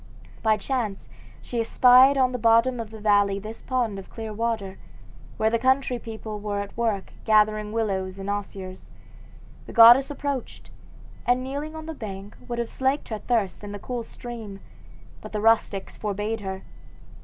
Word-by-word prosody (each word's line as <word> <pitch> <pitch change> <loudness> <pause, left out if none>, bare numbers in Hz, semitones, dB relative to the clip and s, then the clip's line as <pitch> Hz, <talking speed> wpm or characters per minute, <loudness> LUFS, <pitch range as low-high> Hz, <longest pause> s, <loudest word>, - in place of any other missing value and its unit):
By 220 -1 +3
chance 215 -2 -3 0.4
she 240 -2 -2
espied 255 +4 +6
on 255 -1 +3
the 250 - -3
bottom 230 +2 +4
of 225 -2 -5
the 220 0 -10
valley 205 -2 +3
this 215 +3 -8
pond 240 -6 -1
of 190 - -11
clear 220 -2 -6
water, 220 -3 -3 0.6
where 220 0 +2
the 230 - +1
country 260 0 +2
people 220 -2 -7
were 205 -1 -3
at 200 0 -6
work 225 -4 -2
gathering 215 -1 +3
willows 195 -4 -2
and 195 0 -7
osiers. 195 -2 -5 0.8
The - - -9
goddess 240 +3 +8
approached, 285 -3 -5 0.6
and 250 +1 +3
kneeling 285 +4 -5
on 315 0 -7
the 320 - -5
bank 200 -6 -8
would 240 - -4
have 235 -1 -1
slaked 265 +4 -1
her 215 -2 -4
thirst 215 -5 -1
in 205 0 -7
the - - -5
cool 245 +4 -4
stream, 225 -5 -8 0.6
but - - -10
the 210 - -1
rustics 215 -3 +1
forbade 210 +2 -2
her. 190 -1 -6
220 Hz, 165 wpm, -25 LUFS, 205-245 Hz, 0.8 s, goddess